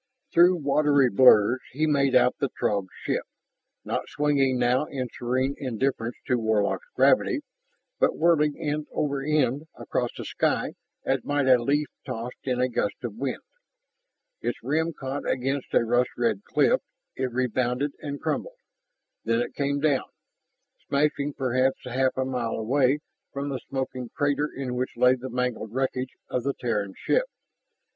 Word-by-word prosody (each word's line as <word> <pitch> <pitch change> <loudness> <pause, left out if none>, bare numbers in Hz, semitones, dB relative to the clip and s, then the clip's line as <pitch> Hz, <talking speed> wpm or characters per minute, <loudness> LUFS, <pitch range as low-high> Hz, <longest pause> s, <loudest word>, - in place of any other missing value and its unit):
Through 175 +2 +6
watery 145 -4 +3
blurs 120 +1 +6
he 155 +4 +1
made 140 -3 +2
out 125 0 +5
the 140 - 0
Throg 100 -5 -1 0.2
ship, - - 0 0.6
not - - -3
swinging 140 -3 +2
now 125 +3 +2
in 130 -4 -4
serene 130 +3 0
indifference 125 -2 -1
to 125 -1 +1
Warlock's 110 - 0
gravity, 310 -5 +3 0.6
but - - +2
whirling 155 -3 +3
end 150 -1 -2
over 140 -2 -1
end 145 0 +1
across - - -1
the - - -6
sky - - 0 0.3
as - - +1
might 145 -1 0
a 125 -2 +6
leaf 145 +5 +1 0.2
tossed 125 -2 -6
in 125 -2 0
a 125 - +3
gust 120 -4 -1
of 120 -4 -3
wind. 130 +2 -3 1.0
Its - - -2
rim 160 +4 0
caught 140 -2 -4
against 135 +1 -1
a - - +4
rust 120 +2 +2
red 115 -4 0
cliff, - - +3 0.3
it 130 -1 -2
rebounded 125 +2 0
and 145 -1 -5
crumpled. - - -3 0.7
Then 115 +1 +1
it 120 - -2
came 140 0 0
down, 145 -3 +2 0.8
smashing 145 0 +1
perhaps 130 0 +1
half 130 +1 0
a 130 - +1
mile 125 -3 -2
away 130 +5 +2 0.3
from 140 +1 -3
the 135 -2 -3
smoking 130 -2 -3
crater 145 0 +1
in 130 -2 -4
which 125 +1 -3
lay 125 0 +6
the 130 0 -5
mangled 125 -3 -2
wreckage 130 -1 -1
of 125 - -1
the 140 +2 -2
Terran 105 -5 -2
ship. - - +1
130 Hz, 155 wpm, -26 LUFS, 125-145 Hz, 1.0 s, Through